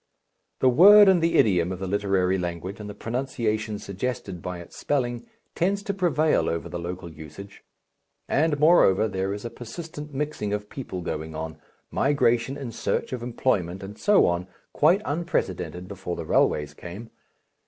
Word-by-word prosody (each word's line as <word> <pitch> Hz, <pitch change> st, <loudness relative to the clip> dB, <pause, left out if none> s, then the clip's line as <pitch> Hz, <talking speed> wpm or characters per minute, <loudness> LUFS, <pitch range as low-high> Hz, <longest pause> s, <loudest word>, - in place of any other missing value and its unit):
The 130 Hz, -, +6 dB
word 200 Hz, +10 st, +8 dB
and 185 Hz, -3 st, +5 dB
the 165 Hz, 0 st, +2 dB
idiom 90 Hz, -4 st, +3 dB
of 95 Hz, -, -4 dB
the 95 Hz, -, -5 dB
literary 95 Hz, -1 st, +1 dB
language 90 Hz, +3 st, -4 dB
and 105 Hz, -1 st, -7 dB
the 100 Hz, -, -8 dB
pronunciation 115 Hz, -3 st, -2 dB
suggested 100 Hz, -3 st, -4 dB
by 90 Hz, +1 st, -5 dB
its 85 Hz, -, -12 dB
spelling 120 Hz, -4 st, -2 dB, 0.3 s
tends 200 Hz, +3 st, 0 dB
to 200 Hz, -2 st, -2 dB
prevail 165 Hz, -5 st, +2 dB
over 85 Hz, +1 st, -3 dB
the 85 Hz, +1 st, -5 dB
local 85 Hz, +1 st, -5 dB
usage. 80 Hz, +6 st, -11 dB, 0.6 s
And 150 Hz, 0 st, +1 dB
moreover 140 Hz, -, +5 dB
there 95 Hz, -1 st, -2 dB
is 100 Hz, +3 st, -5 dB
a 120 Hz, -, -4 dB
persistent 150 Hz, +5 st, -8 dB
mixing 140 Hz, -7 st, -3 dB
of 105 Hz, 0 st, -4 dB
peoples 95 Hz, -10 st, -6 dB
going 80 Hz, +1 st, -4 dB
on, 80 Hz, 0 st, -6 dB, 0.3 s
migration 135 Hz, -2 st, +2 dB
in 135 Hz, -4 st, -6 dB
search 115 Hz, -, -2 dB
of 125 Hz, -, -4 dB
employment 100 Hz, -7 st, -1 dB
and 100 Hz, +2 st, -8 dB
so 205 Hz, -, +4 dB
on, 85 Hz, +1 st, 0 dB, 0.3 s
quite 175 Hz, +8 st, +4 dB
unprecedented 145 Hz, -, -2 dB
before 95 Hz, -3 st, -5 dB
the 85 Hz, -, -6 dB
railways 75 Hz, -1 st, +2 dB
came. 95 Hz, +9 st, -9 dB
105 Hz, 165 wpm, -25 LUFS, 90-145 Hz, 0.6 s, word